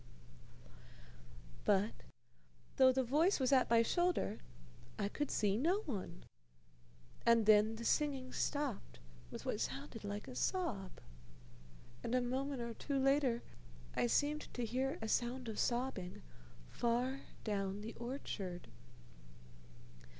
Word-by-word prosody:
"_ -, -, -21 dB, 0.9 s
But, 205 Hz, +1 st, +3 dB, 0.9 s
though 260 Hz, -1 st, +8 dB
the 260 Hz, 0 st, +1 dB
voice 300 Hz, +10 st, +3 dB
was 260 Hz, -1 st, +2 dB
at 260 Hz, -2 st, +4 dB
my 230 Hz, 0 st, +6 dB
shoulder, 350 Hz, +8 st, +1 dB, 0.6 s
I 200 Hz, -, 0 dB
could 295 Hz, +7 st, -2 dB
see 205 Hz, -1 st, +2 dB
no 350 Hz, -, +2 dB
one, 200 Hz, -, -5 dB, 1.0 s
and 235 Hz, -2 st, +5 dB
then 215 Hz, +1 st, +6 dB
the 230 Hz, +1 st, -6 dB
singing 270 Hz, -3 st, +1 dB
stopped 285 Hz, -, -2 dB, 0.3 s
with -, -, -8 dB
what -, -, -1 dB
sounded 145 Hz, -, -4 dB
like 205 Hz, 0 st, -4 dB
a -, -, -7 dB
sob; 250 Hz, -, -1 dB, 1.1 s
and 235 Hz, +2 st, 0 dB
a -, -, +5 dB
moment 260 Hz, +1 st, -2 dB
or 235 Hz, 0 st, -4 dB
two 280 Hz, +5 st, -2 dB
later 270 Hz, -3 st, +3 dB, 0.5 s
I -, -, +2 dB
seemed 295 Hz, +5 st, +1 dB
to 245 Hz, -, -1 dB
hear 260 Hz, +4 st, -1 dB
a -, -, -2 dB
sound 240 Hz, +2 st, 0 dB
of 220 Hz, -, -4 dB
sobbing 240 Hz, -, -1 dB, 0.5 s
far 245 Hz, +3 st, 0 dB, 0.2 s
down 200 Hz, -2 st, -1 dB
the 225 Hz, +2 st, -6 dB
orchard. 215 Hz, -8 st, -5 dB
240 Hz, 130 wpm, -37 LUFS, 215-270 Hz, 1.1 s, though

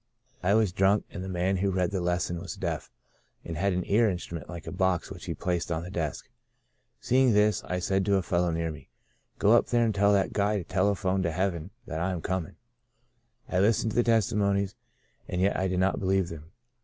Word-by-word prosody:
I 100 Hz, +3 st, +3 dB
was 110 Hz, -4 st, +3 dB
drunk, 95 Hz, +3 st, +2 dB
and 95 Hz, -, -6 dB
the 95 Hz, -, -5 dB
man 95 Hz, +1 st, 0 dB
who 100 Hz, +2 st, +1 dB
read 90 Hz, -1 st, 0 dB
the 95 Hz, -2 st, -1 dB
lesson 90 Hz, 0 st, -1 dB
was -, -, -6 dB
deaf, -, -, -3 dB, 0.6 s
and 85 Hz, -, -5 dB
had 100 Hz, +5 st, +1 dB
an 90 Hz, 0 st, -1 dB
ear 110 Hz, +2 st, +3 dB
instrument 85 Hz, -3 st, -5 dB
like 85 Hz, -2 st, -7 dB
a -, -, -5 dB
box, 95 Hz, -2 st, 0 dB
which -, -, -8 dB
he -, -, -3 dB
placed 90 Hz, -1 st, -2 dB
on 80 Hz, 0 st, -1 dB
the 90 Hz, -, -8 dB
desk. 80 Hz, -7 st, -3 dB, 0.7 s
Seeing 130 Hz, -1 st, +3 dB
this, 105 Hz, 0 st, +3 dB
I 90 Hz, -, -2 dB
said 95 Hz, +2 st, 0 dB
to 100 Hz, 0 st, +3 dB
a 95 Hz, -, +1 dB
fellow 85 Hz, 0 st, +1 dB
near 80 Hz, 0 st, -1 dB
me, 75 Hz, -, -12 dB, 0.2 s
* -, -, -44 dB
Go 105 Hz, -, +3 dB
up 120 Hz, -, +5 dB
there 120 Hz, -1 st, +2 dB
and 110 Hz, -, +1 dB
tell 100 Hz, +1 st, +3 dB
that 100 Hz, -2 st, +1 dB
guy 105 Hz, +1 st, +1 dB
to 95 Hz, -, -3 dB
telephone 95 Hz, +1 st, +1 dB
to 85 Hz, -3 st, 0 dB
heaven 90 Hz, -2 st, -2 dB, 0.2 s
that 80 Hz, -, -4 dB
I 95 Hz, +2 st, 0 dB
am 85 Hz, -, -4 dB
coming.' 95 Hz, 0 st, -3 dB, 0.9 s
I 90 Hz, -, 0 dB
listened 110 Hz, +2 st, +2 dB
to -, -, -6 dB
the 120 Hz, -, +5 dB
testimonies 100 Hz, -4 st, +1 dB, 0.5 s
and 90 Hz, -, -3 dB
yet 95 Hz, +2 st, +2 dB
I 95 Hz, -, 0 dB
did 90 Hz, -1 st, -1 dB
not 95 Hz, +1 st, +1 dB
believe 95 Hz, -2 st, +1 dB
them. 80 Hz, -2 st, -8 dB
95 Hz, 225 wpm, -28 LUFS, 90-100 Hz, 0.9 s, up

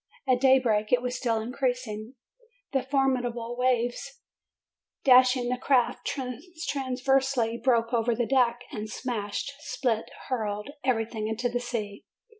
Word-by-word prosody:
At 250 Hz, -1 st, +3 dB
daybreak 245 Hz, -6 st, +3 dB
it 245 Hz, 0 st, +3 dB
was 250 Hz, 0 st, -2 dB
still 230 Hz, -3 st, 0 dB
in 225 Hz, +3 st, -5 dB
creasing. 245 Hz, -3 st, -2 dB, 0.6 s
The 270 Hz, -, +2 dB
formidable 250 Hz, -3 st, 0 dB
waves 250 Hz, -, 0 dB, 0.8 s
dashing 255 Hz, -1 st, +5 dB
the 250 Hz, 0 st, -1 dB
craft 255 Hz, -3 st, +1 dB, 0.6 s
transversely, 260 Hz, -4 st, 0 dB
broke 235 Hz, -2 st, +2 dB
over 235 Hz, 0 st, +2 dB
the 240 Hz, +1 st, 0 dB
deck, 245 Hz, -2 st, +2 dB
and 215 Hz, -5 st, -5 dB
smashed, 220 Hz, 0 st, -3 dB
split, 240 Hz, -6 st, -1 dB, 0.2 s
hurled 210 Hz, -1 st, -2 dB
everything 225 Hz, -3 st, 0 dB
into 230 Hz, +3 st, -1 dB
the 245 Hz, 0 st, -1 dB
sea. 220 Hz, -5 st, -4 dB
245 Hz, 125 wpm, -27 LUFS, 225-260 Hz, 0.8 s, dashing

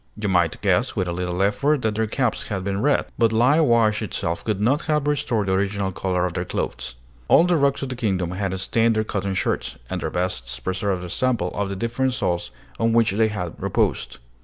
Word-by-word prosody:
You 105 Hz, -1 st, -1 dB
might 85 Hz, -3 st, +2 dB
guess, -, -, +2 dB
with 90 Hz, -, 0 dB
a -, -, -1 dB
little 90 Hz, +1 st, -1 dB
effort, 140 Hz, +8 st, +1 dB
that 110 Hz, -1 st, +1 dB
their 110 Hz, +1 st, 0 dB
caps 125 Hz, +1 st, -1 dB
had 95 Hz, -2 st, -3 dB
been 100 Hz, +1 st, -2 dB
red; 145 Hz, +3 st, +2 dB
but 115 Hz, -2 st, +4 dB
lye 125 Hz, +7 st, +4 dB
wash 115 Hz, -7 st, +3 dB
itself 85 Hz, -5 st, -3 dB
could 105 Hz, -3 st, -1 dB
not 130 Hz, +9 st, +2 dB
have 150 Hz, -2 st, +2 dB
restored 125 Hz, -7 st, 0 dB
the 95 Hz, -, 0 dB
original 100 Hz, 0 st, 0 dB
color 90 Hz, -1 st, -1 dB
of 90 Hz, -, -3 dB
their 90 Hz, -, -2 dB
clothes. 65 Hz, -7 st, -4 dB, 0.3 s
All -, -, +6 dB
the 175 Hz, 0 st, +2 dB
rocks 140 Hz, -2 st, +2 dB
of 135 Hz, -, -3 dB
the 130 Hz, -, -4 dB
kingdom 95 Hz, -8 st, -1 dB
had 95 Hz, 0 st, -2 dB
stained 115 Hz, +4 st, +2 dB
their 110 Hz, -, +1 dB
cotton 100 Hz, -2 st, -2 dB
shirts, -, -, -1 dB
and -, -, -2 dB
their -, -, -2 dB
vests 60 Hz, -10 st, -3 dB
preserved 95 Hz, +5 st, -2 dB
a 90 Hz, -, -6 dB
sample 120 Hz, -8 st, 0 dB
of 100 Hz, -1 st, -2 dB
the 100 Hz, -, -3 dB
different 120 Hz, +5 st, -1 dB
soils 90 Hz, -8 st, -1 dB, 0.3 s
on 115 Hz, 0 st, +2 dB
which 115 Hz, -2 st, +4 dB
they 110 Hz, +3 st, +2 dB
had 100 Hz, -6 st, -4 dB
reposed. -, -, 0 dB
105 Hz, 220 wpm, -23 LUFS, 90-115 Hz, 0.3 s, All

